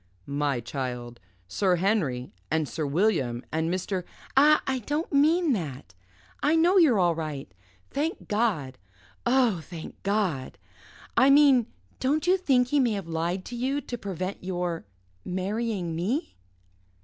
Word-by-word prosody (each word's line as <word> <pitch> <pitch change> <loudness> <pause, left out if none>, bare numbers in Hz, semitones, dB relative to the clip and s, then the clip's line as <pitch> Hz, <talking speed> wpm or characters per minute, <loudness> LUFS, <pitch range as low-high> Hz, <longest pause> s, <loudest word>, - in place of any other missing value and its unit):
"My 140 -2 -1
child 120 -1 -5 0.3
Sir 185 - +2
Henry 165 - 0 0.2
and 160 -1 0
Sir 155 0 -3
William 140 - +1
and 160 +1 0
Mr. 185 0 -2 0.2
" - - -22
"Ah! 300 +3 +6
I 265 -1 0
don't 295 +8 -3
mean 310 +2 +4
that. 135 - -5 0.5
I 300 +3 +3
know 350 +4 +5
you're 290 - +5
all 175 -2 +3
right. 150 - -5 0.4
Thank 300 +4 -2
God! 200 - 0 0.5
Oh, 240 -7 +3
thank 165 0 -10
God! 195 -10 -1 0.6
I 265 - +6
mean, 275 -4 +6 0.3
don't 295 +5 +1
you 365 +1 +5
think 265 -9 +2
he 290 - +3
may 245 -4 +2
have 195 -4 -4
lied 170 +3 -2
to 245 - -6
you 265 +4 0
to 245 - -5
prevent 190 -4 -5
your 175 -2 -3 0.4
marrying 190 -1 -2
me?" 220 - -2
195 Hz, 145 wpm, -27 LUFS, 160-260 Hz, 0.6 s, Ah